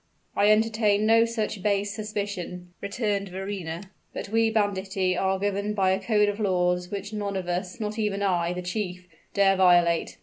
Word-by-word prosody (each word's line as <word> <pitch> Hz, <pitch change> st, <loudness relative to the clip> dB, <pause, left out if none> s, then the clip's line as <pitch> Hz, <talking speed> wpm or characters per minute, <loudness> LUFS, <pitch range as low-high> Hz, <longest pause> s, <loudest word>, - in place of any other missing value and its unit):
"I 205 Hz, +1 st, +4 dB
entertain 215 Hz, -1 st, +3 dB
no 225 Hz, +1 st, +5 dB
such 220 Hz, -3 st, -3 dB
base 200 Hz, 0 st, 0 dB
suspicion," 200 Hz, -4 st, -5 dB
returned 200 Hz, -1 st, -2 dB
Verrina. 190 Hz, -1 st, -5 dB, 0.2 s
"But -, -, -5 dB
we 225 Hz, +1 st, +3 dB
banditti 195 Hz, -3 st, 0 dB
are 190 Hz, +1 st, +1 dB
governed 200 Hz, +1 st, -1 dB
by 190 Hz, -2 st, +3 dB
a 190 Hz, -, +1 dB
code 210 Hz, 0 st, +3 dB
of 205 Hz, +1 st, -2 dB
laws 180 Hz, -3 st, +1 dB
which 200 Hz, +1 st, -5 dB
none 205 Hz, -2 st, -3 dB
of 185 Hz, -2 st, -4 dB
us 180 Hz, +5 st, -3 dB
not 215 Hz, 0 st, -3 dB
even 205 Hz, -2 st, -1 dB
I, 175 Hz, -3 st, +1 dB
the 180 Hz, 0 st, -4 dB
chief 180 Hz, -1 st, -4 dB, 0.3 s
dare 195 Hz, -1 st, +4 dB
violate. 175 Hz, -3 st, +3 dB
200 Hz, 170 wpm, -26 LUFS, 185-210 Hz, 0.3 s, no